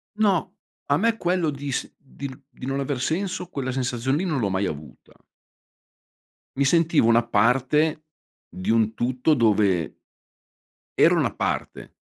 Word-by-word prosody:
No. 205 Hz, -5 st, +1 dB, 0.3 s
A 145 Hz, -, +3 dB
me 225 Hz, +1 st, +2 dB
quello 175 Hz, -4 st, 0 dB
di 140 Hz, -1 st, -5 dB
s -, -, -3 dB
di 140 Hz, 0 st, -9 dB
n 130 Hz, +2 st, -13 dB
di -, -, -10 dB
non 135 Hz, +1 st, -1 dB
aver 135 Hz, -2 st, -3 dB
senso 180 Hz, +5 st, -2 dB
quella 130 Hz, -2 st, -4 dB
sensazione 130 Hz, +2 st, -1 dB
lì 185 Hz, -, -2 dB
non 155 Hz, -8 st, -1 dB
l'ho 100 Hz, -3 st, 0 dB
mai 95 Hz, +1 st, 0 dB
avuta. 75 Hz, -2 st, -8 dB, 1.4 s
Mi 140 Hz, -, +2 dB
sentivo 160 Hz, -5 st, +3 dB
una 115 Hz, 0 st, +4 dB
parte 135 Hz, +8 st, +2 dB, 0.4 s
di 95 Hz, -, -8 dB
un 110 Hz, -1 st, +2 dB
tutto 125 Hz, +6 st, 0 dB
dove 105 Hz, -, +2 dB, 0.9 s
ero -, -, +4 dB
una -, -, 0 dB
parte -, -, -4 dB
135 Hz, 150 wpm, -24 LUFS, 115-155 Hz, 1.4 s, una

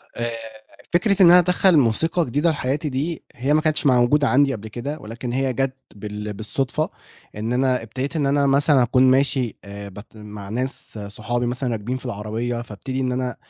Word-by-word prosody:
آآ، 120 Hz, 0 st, -2 dB, 0.6 s
فكرة 195 Hz, +2 st, +3 dB
إن -, -, +9 dB
أنا 180 Hz, -, +9 dB
أدخّل 180 Hz, -1 st, +3 dB
موسيقى 160 Hz, +8 st, +2 dB
جديدة 145 Hz, +7 st, +1 dB
في 150 Hz, -, -4 dB
حياتي 145 Hz, +4 st, -2 dB
دي 150 Hz, +5 st, -3 dB
هي 135 Hz, +4 st, 0 dB
ما 155 Hz, -, +4 dB
كانتش 155 Hz, -1 st, 0 dB
موجودة 130 Hz, +2 st, +4 dB
عندي 135 Hz, +1 st, +3 dB
قبل 110 Hz, -1 st, -7 dB
كده، 140 Hz, +8 st, -5 dB
ولكن 120 Hz, +1 st, -6 dB
هي 130 Hz, 0 st, 0 dB
جَات 135 Hz, +1 st, -1 dB, 0.2 s
بال 105 Hz, 0 st, -6 dB
بالصدفة 135 Hz, +8 st, -1 dB, 0.5 s
إن 110 Hz, +3 st, -3 dB
أنا 130 Hz, -1 st, +1 dB
ابتديت 130 Hz, +7 st, -5 dB
إن 150 Hz, -3 st, +1 dB
أنا 140 Hz, 0 st, +2 dB
مثلًا 140 Hz, -1 st, +4 dB
أكون 125 Hz, +2 st, +3 dB
ماشي 130 Hz, -3 st, +1 dB
آآ 100 Hz, 0 st, -8 dB
بت 105 Hz, +4 st, -13 dB
مع 105 Hz, -2 st, -9 dB
ناس 125 Hz, -1 st, -3 dB
صحابي 110 Hz, +4 st, -3 dB
مثلًا 125 Hz, +1 st, -1 dB
راكبين 115 Hz, +4 st, -3 dB
في 130 Hz, -, -11 dB
العربية، 115 Hz, +2 st, -3 dB
فابتدي 120 Hz, +4 st, -6 dB
إن 130 Hz, -1 st, 0 dB
أنا 125 Hz, -1 st, -2 dB
130 Hz, 185 wpm, -22 LUFS, 115-140 Hz, 0.6 s, إن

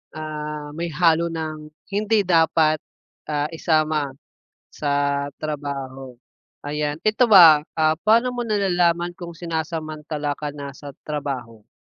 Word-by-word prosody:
ah, 150 Hz, -1 st, -5 dB
may 170 Hz, +3 st, -4 dB
halo 170 Hz, 0 st, +3 dB
ng 155 Hz, -2 st, -5 dB, 0.2 s
hindi 210 Hz, +1 st, +2 dB
dapat 160 Hz, -3 st, +3 dB, 0.5 s
ah, 150 Hz, +1 st, -1 dB
isama 155 Hz, -4 st, 0 dB, 0.5 s
sa 140 Hz, -1 st, -1 dB
trabaho. 135 Hz, -4 st, -5 dB, 0.4 s
Ayan, 150 Hz, 0 st, -2 dB
ito 215 Hz, +3 st, +3 dB
ba, 170 Hz, -8 st, +9 dB, 0.2 s
ah, 155 Hz, 0 st, +2 dB
paano 235 Hz, +3 st, +4 dB
mo 240 Hz, -1 st, -4 dB
nalalaman 175 Hz, -4 st, +1 dB
kung 170 Hz, -1 st, -8 dB
sinasamantala 155 Hz, -3 st, -4 dB
ka 150 Hz, -1 st, -5 dB
na 140 Hz, -1 st, -6 dB
sa 140 Hz, 0 st, -11 dB
trabaho? 130 Hz, -7 st, -5 dB
155 Hz, 115 wpm, -22 LUFS, 145-170 Hz, 0.5 s, ba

